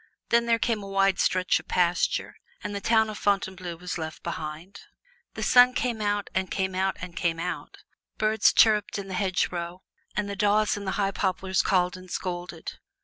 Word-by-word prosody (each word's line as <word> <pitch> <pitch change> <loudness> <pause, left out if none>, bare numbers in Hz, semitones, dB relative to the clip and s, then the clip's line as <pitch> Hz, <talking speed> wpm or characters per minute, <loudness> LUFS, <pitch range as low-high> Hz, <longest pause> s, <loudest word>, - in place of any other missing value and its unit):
Then 235 0 +3
there 230 0 +4
came 225 -2 0
a 200 - -8
wide 195 -1 +2
stretch 185 0 +2
of - - -15
pasture, 175 -1 +1 0.3
and 205 - -4
the 200 - -4
town 220 0 +3
of 215 -1 -6
Fontainebleau 190 -3 -1
was 180 +1 -5
left 160 -1 -6
behind. 160 +6 -6 0.6
The - - -4
sun 250 0 +6
came 235 -3 -1
out 205 -1 0
and 190 0 -1
came 190 -1 -1
out 190 +1 0
and 175 -1 -8
came 170 -1 -1
out; 180 +2 -5 0.4
birds 215 +1 +3
chirruped 210 -2 +4
in 195 -1 -6
the - - -5
hedgerows 180 -2 -1 0.3
and 210 0 -1
the 200 - -4
daws 210 +1 +2
in 205 -1 -6
the 190 - -1
high 195 -1 +1
poplars 190 -1 0
called 180 -2 +1
and 185 0 -13
scolded. 175 -1 -5
195 Hz, 190 wpm, -26 LUFS, 180-205 Hz, 0.6 s, sun